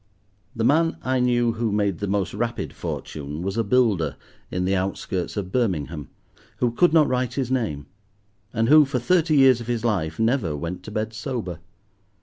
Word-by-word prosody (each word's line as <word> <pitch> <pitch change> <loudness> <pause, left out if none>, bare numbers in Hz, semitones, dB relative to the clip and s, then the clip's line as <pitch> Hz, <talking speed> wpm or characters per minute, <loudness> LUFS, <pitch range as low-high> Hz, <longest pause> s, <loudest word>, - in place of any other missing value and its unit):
The 115 - -1
man 165 +6 +3
I 130 0 +1
knew 120 -1 +2
who 115 -1 -2
made 100 -4 0
the 100 - -2
most 100 -1 -1
rapid - - -3
fortune 75 +2 -5
was 95 +1 -2
a 115 - +1
builder 100 - +2 0.3
in 90 0 -2
the 95 +1 +1
outskirts 95 0 -3
of 95 -2 -3
Birmingham, 80 - -1 0.5
who 120 -1 +1
could 175 +9 +3
not 155 -2 +5
write 125 -1 -1
his 130 -3 -2
name, 105 - -1 0.7
and 115 +1 0
who, 155 +3 +8
for 135 -2 -2
thirty 160 +4 +2
years 130 -3 +6
of 120 - -8
his 120 -1 -1
life, 90 -8 -1
never 110 - +1
went 85 +5 -5
to 105 - -7
bed 110 +1 -3
sober. 110 - -4
110 Hz, 180 wpm, -24 LUFS, 90-125 Hz, 0.7 s, who